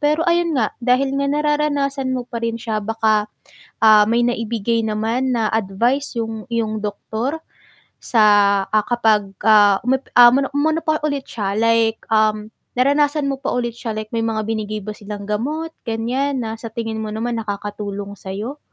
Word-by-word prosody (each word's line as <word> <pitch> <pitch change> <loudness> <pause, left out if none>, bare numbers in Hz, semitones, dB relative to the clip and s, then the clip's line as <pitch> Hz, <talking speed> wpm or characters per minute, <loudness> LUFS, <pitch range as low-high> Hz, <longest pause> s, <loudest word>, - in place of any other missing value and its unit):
Pero 300 +2 +1
ayun 340 -1 +2
nga, 220 - 0
dahil 260 +2 +2
nga 280 - 0
nararanasan 290 -2 0
mo 250 - -3
pa 235 - -5
rin 230 0 -1
siya 220 -2 -2
baka, 215 -1 +1 0.6
ah, 215 -1 +8
may 235 +1 +2
naibigay 230 -1 -1
naman 225 +4 -1
na 220 -2 +1
advice 235 +7 0
'yong 225 -1 -5
iyong 220 -2 -1
doktor 220 +7 -3 0.6
sa, 225 -3 +3 0.4
ah, 215 0 +2
kapag, 220 -4 +2 0.2
ah, 205 -2 +6
umepe 265 +1 0
ah, 240 0 +10
mono 275 0 +1
umano 315 +3 +1
pa 310 0 +1
ulit 285 -2 -2
siya, 200 -3 -3
like, 230 0 +2
um, 215 -1 +2 0.3
naranasan 285 +2 +2
mo 270 - -3
pa 275 - -2
ulit 240 -1 -1
siya, 230 -2 -4
like 215 0 -5
may - - 0
mga 220 -1 -1
binigay 215 -1 -3
ba 215 - -5
silang 205 0 -8
gamot, 295 +10 -2 0.2
ganiyan, 250 +5 -1
na 220 -1 -4
sa 230 0 -7
tingin 225 -2 -3
mo - - -4
naman 230 +1 -2
nakakatulong 205 -1 -5
sayo? 210 +9 -6
230 Hz, 170 wpm, -20 LUFS, 215-270 Hz, 0.6 s, ah